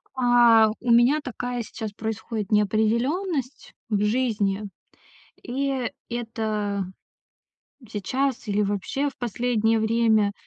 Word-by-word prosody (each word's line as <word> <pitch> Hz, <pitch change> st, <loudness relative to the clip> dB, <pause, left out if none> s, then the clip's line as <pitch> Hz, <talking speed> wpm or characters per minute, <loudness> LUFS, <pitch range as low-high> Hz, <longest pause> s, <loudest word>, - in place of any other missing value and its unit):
А, 240 Hz, -3 st, +5 dB
у 245 Hz, -, 0 dB
меня 245 Hz, +6 st, +5 dB
такая 245 Hz, -2 st, -4 dB
сейчас 215 Hz, 0 st, -6 dB
происходит 220 Hz, 0 st, -4 dB
неопределённость 235 Hz, -, 0 dB, 0.2 s
в 210 Hz, -2 st, +1 dB
жизни. 210 Hz, -3 st, 0 dB, 0.8 s
И 265 Hz, -1 st, -2 dB, 0.2 s
это 215 Hz, -4 st, -2 dB, 1.0 s
сейчас 255 Hz, +4 st, -2 dB
или 205 Hz, +1 st, +1 dB
вообще 205 Hz, +8 st, -1 dB
в 275 Hz, -, -10 dB
последнее 225 Hz, -1 st, +1 dB
время, 220 Hz, -2 st, +2 dB
225 Hz, 100 wpm, -24 LUFS, 210-250 Hz, 1.0 s, А